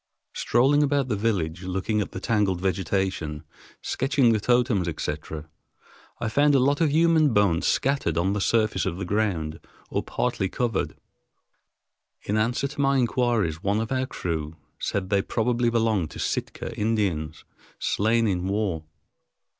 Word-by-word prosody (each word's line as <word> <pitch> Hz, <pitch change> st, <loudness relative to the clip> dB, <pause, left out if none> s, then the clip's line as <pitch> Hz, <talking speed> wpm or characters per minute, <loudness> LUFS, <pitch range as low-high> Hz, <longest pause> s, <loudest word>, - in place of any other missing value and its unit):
Strolling 135 Hz, +5 st, +3 dB
about 140 Hz, -2 st, +1 dB
the 110 Hz, -, +1 dB
village, 95 Hz, -6 st, -1 dB
looking 95 Hz, +3 st, -1 dB
at -, -, -3 dB
the -, -, -5 dB
tangled 100 Hz, -4 st, +1 dB
vegetation, 95 Hz, -4 st, -1 dB, 0.4 s
sketching 135 Hz, -3 st, +2 dB
the 110 Hz, -, +1 dB
totems, 120 Hz, -5 st, +2 dB
etc., 75 Hz, -1 st, -4 dB, 0.7 s
I 115 Hz, -, -2 dB
found 145 Hz, +6 st, +3 dB
a -, -, +5 dB
lot 140 Hz, +4 st, +2 dB
of 160 Hz, -, +4 dB
human 160 Hz, -3 st, +4 dB
bones 100 Hz, -5 st, +3 dB
scattered 135 Hz, -, +1 dB
on 95 Hz, +3 st, +1 dB
the 105 Hz, -, -1 dB
surface 110 Hz, -3 st, +1 dB
of 85 Hz, -, -3 dB
the 95 Hz, -, -4 dB
ground 85 Hz, -6 st, -1 dB, 0.3 s
or -, -, 0 dB
partly 95 Hz, -, -1 dB
covered. 115 Hz, -1 st, -1 dB, 1.3 s
In 105 Hz, -, -1 dB
answer 120 Hz, +5 st, +1 dB
to 140 Hz, +1 st, -5 dB
my 140 Hz, 0 st, +3 dB
inquiries, 120 Hz, -, +1 dB
one 100 Hz, +2 st, +1 dB
of 115 Hz, +2 st, -3 dB
our 130 Hz, 0 st, 0 dB
crew 80 Hz, -6 st, -4 dB, 0.2 s
said 95 Hz, -1 st, -2 dB
they 100 Hz, -1 st, +3 dB
probably 120 Hz, +3 st, 0 dB
belonged 110 Hz, -8 st, +1 dB
to -, -, -10 dB
Sitka 115 Hz, -, -3 dB
Indians, 100 Hz, -9 st, -1 dB, 0.3 s
slain 115 Hz, +3 st, +1 dB
in 95 Hz, -3 st, 0 dB
war. 95 Hz, -5 st, -1 dB
105 Hz, 150 wpm, -25 LUFS, 90-120 Hz, 1.3 s, a